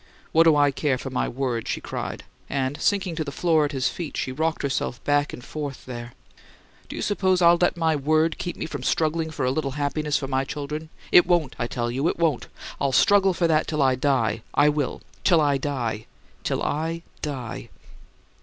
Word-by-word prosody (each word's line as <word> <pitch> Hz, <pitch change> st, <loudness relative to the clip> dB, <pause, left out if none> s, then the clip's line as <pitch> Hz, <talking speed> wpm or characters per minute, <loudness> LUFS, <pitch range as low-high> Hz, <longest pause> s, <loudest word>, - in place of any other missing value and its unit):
"What 165 Hz, +1 st, +5 dB
do 160 Hz, -2 st, +6 dB
I 145 Hz, -1 st, +4 dB
care 135 Hz, -1 st, 0 dB
for 135 Hz, +1 st, -6 dB
my 130 Hz, -, 0 dB
word?" 125 Hz, -3 st, -2 dB
she -, -, -1 dB
cried, -, -, -5 dB, 0.3 s
and, 135 Hz, +1 st, -2 dB
sinking 190 Hz, -4 st, +1 dB
to 155 Hz, -, 0 dB
the 140 Hz, -, -6 dB
floor 160 Hz, 0 st, +2 dB
at 145 Hz, -, -3 dB
his 135 Hz, -3 st, 0 dB
feet, 170 Hz, -4 st, -4 dB, 0.2 s
rocked 160 Hz, +2 st, -1 dB
herself 135 Hz, -3 st, -1 dB
back 145 Hz, 0 st, +2 dB
and 125 Hz, -, -9 dB
forth 145 Hz, -3 st, -6 dB
there. 120 Hz, -1 st, -7 dB, 0.8 s
"Do -, -, -6 dB
you -, -, -3 dB
suppose 190 Hz, -3 st, +2 dB
I'll 170 Hz, -1 st, +6 dB
let 175 Hz, -, +2 dB
my 160 Hz, -2 st, +2 dB
'word' 155 Hz, +3 st, +1 dB
keep 175 Hz, -, -3 dB
me -, -, -3 dB
from 160 Hz, -, -5 dB
struggling 160 Hz, 0 st, 0 dB
for 155 Hz, -, -2 dB
a 125 Hz, -, +2 dB
little 135 Hz, -1 st, -2 dB
happiness 145 Hz, +1 st, 0 dB
for 135 Hz, -, -4 dB
my 130 Hz, 0 st, 0 dB
children? 150 Hz, +3 st, -5 dB, 0.2 s
It 175 Hz, -, +7 dB
won't, 165 Hz, -7 st, +2 dB
I 120 Hz, -, 0 dB
tell 120 Hz, 0 st, -2 dB
you; 135 Hz, +6 st, 0 dB
it -, -, 0 dB
won't! 165 Hz, -6 st, +1 dB, 0.3 s
I'll 140 Hz, -1 st, +1 dB
struggle 195 Hz, +7 st, +4 dB
for 170 Hz, -, +1 dB
that 155 Hz, -1 st, +2 dB
till 150 Hz, -3 st, +1 dB
I 130 Hz, -1 st, +4 dB
die! 130 Hz, -4 st, +1 dB
I 145 Hz, +1 st, +5 dB
will, 145 Hz, -3 st, -2 dB, 0.2 s
till 170 Hz, -4 st, +5 dB
I 145 Hz, -2 st, +2 dB
die 120 Hz, -6 st, -3 dB, 0.4 s
till -, -, -1 dB
I 165 Hz, +3 st, -2 dB, 0.2 s
die!" 130 Hz, -6 st, -5 dB
145 Hz, 205 wpm, -24 LUFS, 135-160 Hz, 0.8 s, It